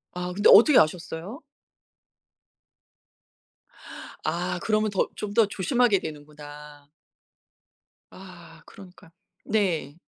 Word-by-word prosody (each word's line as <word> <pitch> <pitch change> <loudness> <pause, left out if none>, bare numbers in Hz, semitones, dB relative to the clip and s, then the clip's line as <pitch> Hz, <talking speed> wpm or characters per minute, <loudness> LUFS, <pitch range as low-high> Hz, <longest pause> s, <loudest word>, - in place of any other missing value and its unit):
아 180 0 -5
근데 205 +2 +4
어떻게 250 +6 +7
아셨어요? 175 - -2 2.8
아 180 +3 -3
그러면 215 0 0
더 195 - -1
좀 205 -1 -6
더 225 -1 +4
조심하게 210 +2 +1
되는구나. 150 -2 -11 1.3
아 175 -3 -14
그러니까. 185 -2 -16 0.3
네. 175 -9 -2
180 Hz, 185 characters per minute, -25 LUFS, 155-205 Hz, 2.8 s, 어떻게